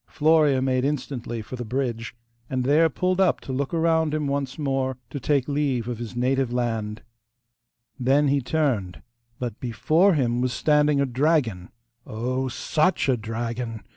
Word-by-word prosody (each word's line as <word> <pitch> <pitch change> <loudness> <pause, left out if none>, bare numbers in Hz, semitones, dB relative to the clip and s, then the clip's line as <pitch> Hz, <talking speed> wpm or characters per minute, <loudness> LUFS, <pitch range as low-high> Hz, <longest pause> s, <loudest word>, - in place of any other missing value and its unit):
Florea 150 -4 +3
made 130 -1 +1
instantly 130 -5 -3
for 120 - -7
the 120 - -5
bridge, 120 -1 -3 0.3
and 130 -1 -1
there 155 +5 +4
pulled 185 +5 0
up 185 - +3
to 130 - -6
look 135 +1 -2
around 160 -2 +2
him 155 -1 -1
once 140 -1 -2
more, 135 -3 -1
to 140 - -4
take 140 -1 +1
leave 140 -5 0
of 120 -2 -4
his 120 0 -6
native 130 +1 +1
land 115 -3 -2 1.0
Then 135 +4 +3
he 140 0 +2
turned, 125 - -1 0.3
but 120 -3 -5
before 155 - +2
him 120 -4 +1
was 125 -1 0
standing 150 0 +3
a 140 - +3
dragon 125 - 0 0.4
oh! 130 +4 -2
SUCH 155 +5 0
a 130 - +4
dragon! 115 0 -4
130 Hz, 160 wpm, -24 LUFS, 120-150 Hz, 1.0 s, there